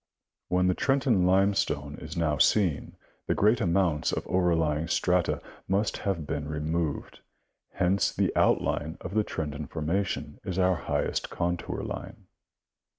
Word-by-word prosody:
Where 90 +1 +2
the 90 0 +3
Trenton 125 -7 +2
limestone 90 -7 +1
is 80 +2 -7
now 75 -4 +1
seen, 90 -5 +2 0.3
the - - +1
greatest 110 +4 +3
amount 85 -5 +1
of - - -2
overlying 80 -4 +1
strata 90 0 +1 0.2
must 100 +3 0
have 90 -6 -2
been 75 0 -3
removed; 75 0 -2 0.5
hence 95 +2 +2
the - - 0
outline 80 +3 +1
of 95 - -6
the 110 0 +3
Trenton 75 -5 -4
formation 85 +6 -2
is 95 - -4
our 95 0 +4
highest - - -2
contour 85 0 -2
line. - - -7
90 Hz, 135 wpm, -28 LUFS, 75-95 Hz, 0.5 s, our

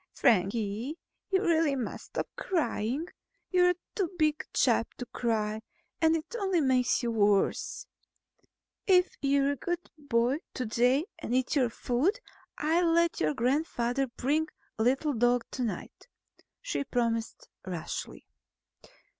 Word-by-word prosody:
"Frankie, 220 - +1 0.3
you 385 0 +2
really 325 -5 +3
must 250 -4 -4
stop - - -4
crying. 300 - -1 0.5
You're 360 -1 +4 0.2
too 380 -5 -1
big 305 -1 +2
a - - -10
chap 230 -2 +2
to 245 - -6
cry 220 -3 -1 0.4
and 320 0 +5
it 325 +7 -5
only 385 -4 +1
makes 255 -4 +2
you 235 - 0
worse. 210 - +1 1.0
If 365 -1 +4
you're 280 0 +3
a - - -1
good 350 +4 -4
boy 255 -2 +1 0.2
to 255 - -2
day 245 +7 +2
and 240 - -2
eat 260 +3 +1
your 255 -4 +3
food, 265 - 0 0.4
I'll 330 +3 +2
let 335 0 +2
your 150 -1 +1
grandfather 255 0 0
bring 290 +6 0 0.3
the 220 - 0
little 270 +4 +2
dog 245 0 +2
tonight," 250 - -4 0.6
she - - -1
promised 230 -3 -2 0.2
rashly. 175 -3 -5
265 Hz, 130 wpm, -29 LUFS, 235-325 Hz, 1.0 s, and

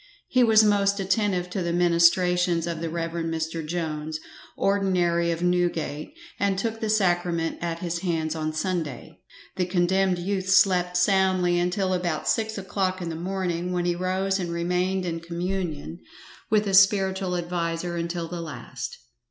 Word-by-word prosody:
He 255 -1 +3
was 220 -2 +6
most 200 -1 +2
attentive 190 -2 0
to 190 - -2
the 170 -1 -1
ministrations 175 0 +3
of 170 -2 -4
the 165 - -2
Rev. 165 0 -3
Mr. 165 0 -3
Jones, 155 -1 -3 0.4
ordinary 180 -4 +1
of 170 +1 -2
Newgate, 175 - -1 0.2
and 200 -1 +1
took 225 +2 -2
the 220 - -2
sacrament 175 -5 +1
at 170 -1 -2
his 170 0 -2
hands 165 -3 -1
on 155 -1 -2
Sunday, 155 -5 -4 0.4
The 180 -1 0
condemned 185 +1 +2
youth 190 +1 -2
slept 180 -2 +4
soundly 185 -1 +3
until 185 +2 0
about 175 -4 -2
six 220 -1 0
o'clock 190 -1 -2
in 175 -2 -4
the 165 - -4
morning, 180 0 -2
when 175 -1 0
he 175 - +2
rose 190 +2 0
and 175 -2 -3
remained 180 +2 0
in 165 -1 -3
communion 170 -1 -4 0.5
with 215 0 +3
his 195 -1 +7
spiritual 190 -2 +2
adviser 170 0 -2
until 170 0 -3
the 175 0 -5
last. 125 -6 -7
180 Hz, 155 wpm, -25 LUFS, 170-190 Hz, 0.5 s, his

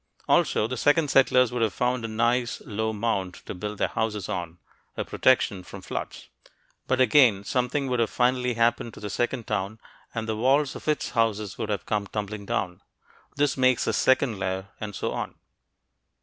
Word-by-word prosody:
Also, - - +3
the 125 +3 -3
second 145 +3 +3
settlers 125 -2 +4
would 125 -1 -2
have 110 -5 +1
found 125 -1 0
a - - -2
nice 120 +2 0
low 110 0 -2
mound 100 -4 -1
to - - -5
build 105 +3 -5
their - - +1
houses 105 -4 -2
on, 90 -4 -4 0.4
a - - -2
protection 110 -7 +2
from 90 - -11
floods. - - -6 0.6
But 130 - +1
again, 120 -5 +5
something 125 +5 -1
would 120 -3 +1
finally 125 -1 +1
have 115 - +2
happened 115 -1 0
to - - -10
the 105 -1 -5
second 120 +1 -1
town, 105 +1 -2 0.4
and 115 -1 -3
the 110 - -1
walls 135 +5 +2
of - - -10
its 150 - 0
houses 110 -3 0
would 110 -2 -3
have 100 -3 -2
come 105 -2 -1
tumbling 105 -1 -5
down. 90 -1 -2 0.5
This 145 -1 +1
makes 130 -2 +3
the - - 0
second 130 -5 +2
layer. 95 0 -3
And 105 -2 -6
so - - -2
on.... - - -4
115 Hz, 185 wpm, -26 LUFS, 105-125 Hz, 0.6 s, again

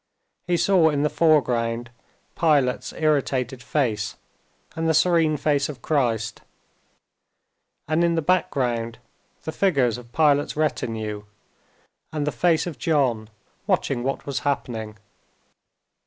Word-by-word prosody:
He 175 -1 +2
saw 175 -1 +4
in 145 -1 0
the 150 - +1
foreground 120 -7 +1 0.4
Pilate's 145 -6 +2
irritated 135 -5 0
face 115 -5 -1 0.6
and 165 0 -1
the 160 - +3
serene 160 -2 +3
face 145 -1 +1
of 130 -6 -9
Christ, 115 -7 0 1.5
and 155 +3 +2
in 170 -1 +2
the 165 - 0
background 120 -9 0 0.5
the 160 - -4
figures 135 - +1
of 120 -1 -15
Pilate's 145 -1 +2
retinue 110 -8 -2 0.9
and 150 -2 -2
the 150 - 0
face 160 +5 +2
of 160 -8 -6
John 125 -8 +1 0.4
watching 120 - 0
what 135 +2 -3
was 140 -2 -2
happening. 115 -6 -3
140 Hz, 120 wpm, -24 LUFS, 120-155 Hz, 1.5 s, saw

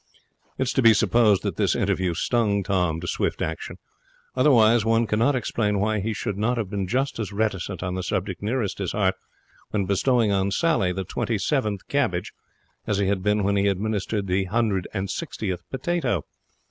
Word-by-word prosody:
It - - +1
is 130 - -1
to 130 - +2
be 115 -2 +7
supposed 105 0 +3
that - - -3
this - - +2
interview 90 -2 0
stung 105 0 +1
Tom 90 -4 0
to 90 - -5
swift - - -1
action. - - -4 0.6
Otherwise, 120 -4 +5
one 115 +1 +2
cannot 115 +6 +2
explain 105 -4 0
why 105 +1 +1
he 110 +3 -2
should 105 -1 -3
not 120 +4 +1
have 105 -4 -3
been 100 -2 -2
just 130 +5 -1
as 105 -2 -3
reticent 100 -3 -2
on 90 0 -2
the 95 - -2
subject 95 0 -3
nearest 110 -1 -2
his 95 -3 -2
heart 95 -3 +2 0.6
when 100 -2 -1
bestowing 110 +3 +2
on 100 0 +1
Sally 100 - +1
the 95 +1 -3
twenty 115 +4 -2
seventh 105 -5 -1
cabbage 120 -11 -1 0.5
as 105 - +1
he 100 - +1
had 95 0 0
been 105 +1 +1
when 100 +1 +2
administering 100 +1 -1
the 95 +1 0
hundred 105 -2 0
and 95 +1 -3
sixtieth 90 -2 -4
potato. 135 - -1
105 Hz, 185 wpm, -24 LUFS, 95-115 Hz, 0.6 s, be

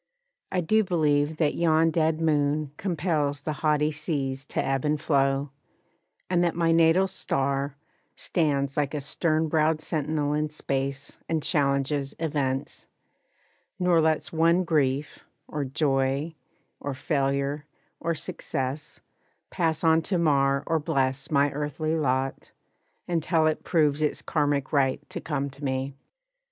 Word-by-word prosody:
I 185 - +1
do 215 +6 +3
believe 155 -4 +1
That 150 -3 +2
yon 165 -1 +3
dead 160 0 +1
moon 150 -2 +1
compels 155 -6 -1
the 155 - -2
haughty 150 -1 +2
seas 140 -4 -2
To - - -2
ebb 135 -1 0
and 150 0 +1
flow, 140 -2 +1 0.8
and 175 -1 +2
that 170 -2 +1
my 165 -1 +2
natal 165 +3 +4
star 140 -4 -1 0.4
Stands 140 -4 0
like 145 0 0
a - - -1
stern 155 +3 0
browed 155 0 +2
sentinel 150 -2 -1
in 150 0 0
space 140 -1 -3
And 160 -2 0
challenges 140 -2 0
events; 140 -4 -2 0.9
nor 180 -3 +3
lets 160 0 0
one 165 +3 +3
grief, 145 -3 0 0.3
Or 150 - -3
joy, 135 +2 0 0.5
or 140 -1 -4
failure, 140 +1 -1 0.3
or 170 0 -1
success, 135 0 -4 0.5
pass 160 -2 0
on 160 0 +5
To 180 +3 -1
mar 140 -4 +2
or 165 -1 +1
bless 135 -3 -1
my 145 -1 +3
earthly 150 +2 -2
lot, 135 -3 -1 0.6
until 165 -1 +1
It 155 -1 0
proves 155 -4 +2
its 150 - 0
Karmic 145 -3 0
right 135 -2 +1
to - - -5
come 140 -2 -2
to 140 +2 -14
me. 135 0 -2
150 Hz, 135 wpm, -26 LUFS, 140-160 Hz, 0.9 s, on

